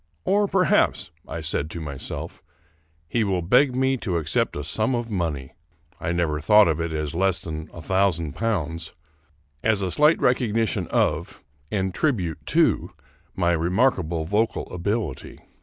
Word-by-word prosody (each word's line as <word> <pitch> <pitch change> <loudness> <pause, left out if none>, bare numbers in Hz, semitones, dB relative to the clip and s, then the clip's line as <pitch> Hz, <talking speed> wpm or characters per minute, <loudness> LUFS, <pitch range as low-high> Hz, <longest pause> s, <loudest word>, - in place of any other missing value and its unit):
Or 205 +1 +3
perhaps, 190 -2 +2 0.2
I 80 +1 -5
said 75 -1 -1
to 85 - -6
myself, 70 -4 -6 0.7
he 115 +7 +1
will 95 -4 0
beg 125 +8 +4
me 130 +1 +2
to 95 -8 -2
accept 80 -2 0
a 75 - -4
sum 110 - 0
of 120 -1 -3
money 80 -9 -3 0.2
— 80 +2 -36
I 85 - -1
never 80 -3 0
thought 105 +6 +6
of 80 -1 0
it 85 0 -2
as 75 -2 -3
less 95 +1 +1
than 80 -1 -6
a 85 - -10
thousand 90 -4 +1
pounds 85 -7 -2 0.4
— 70 -1 -39
^as 110 -3 +2
a 90 - -1
slight 150 - +4
recognition 115 -5 +1
of - - -1 0.3
and 95 -3 -1
tribute 95 - -1
to - - +2 0.4
my 85 -2 +2
remarkable 85 -1 +1
vocal 105 +6 0
ability. 100 - -3
90 Hz, 155 wpm, -24 LUFS, 80-110 Hz, 0.7 s, thought